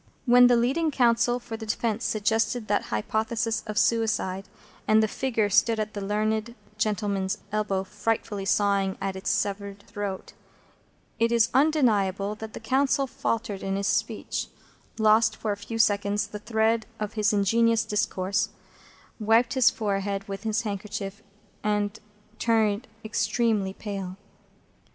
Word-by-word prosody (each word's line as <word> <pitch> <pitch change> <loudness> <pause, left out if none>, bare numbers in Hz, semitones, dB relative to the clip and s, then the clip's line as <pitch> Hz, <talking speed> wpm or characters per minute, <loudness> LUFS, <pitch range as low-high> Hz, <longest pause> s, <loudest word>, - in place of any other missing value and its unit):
When 245 0 +7
the 245 - +5
leading 270 +8 +2
counsel 240 -3 +3
for 240 -2 -7
the 220 - -7
defence 225 +1 -1
suggested 225 +2 0
that 205 - +1
hypothesis 220 - -1
of 215 -1 -4
suicide, 215 -4 +1 0.4
and 220 0 +5
the - - +2
figure 225 -2 0
stood 225 +3 +3
at 215 0 -3
the 205 - -5
learned 215 +3 -1 0.2
gentleman's 205 -2 0
elbow, 205 -2 0
frightfully 210 0 -2
sawing 200 -1 +1
at 195 -1 -3
its 190 - -3
severed 200 0 -2
throat, 200 -2 -5 0.9
it 230 +1 +2
is 230 -1 +4
undeniable 210 -10 +2
that 220 +1 -8
the - - -6
counsel 270 +4 +1
faltered 230 -5 -3
in 195 0 -2
his 200 0 -2
speech, - - -1 0.5
lost 220 0 +4
for 215 - -2
a 205 - -2
few 225 +3 -6
seconds 205 -1 +2
the 210 0 -8
thread 220 +1 +1
of 210 0 -3
his 215 -1 +2
ingenious 225 +3 +3
discourse, 200 -2 0 0.7
wiped 225 +3 +3
his 260 -3 +5
forehead 200 -1 -2
with 195 0 -5
his 220 +1 -1
handkerchief, 205 -1 -5 0.4
and 210 0 0 0.4
turned 220 0 +1 0.2
extremely 220 -3 0
pale. 195 -3 -6
215 Hz, 140 wpm, -26 LUFS, 200-230 Hz, 0.9 s, When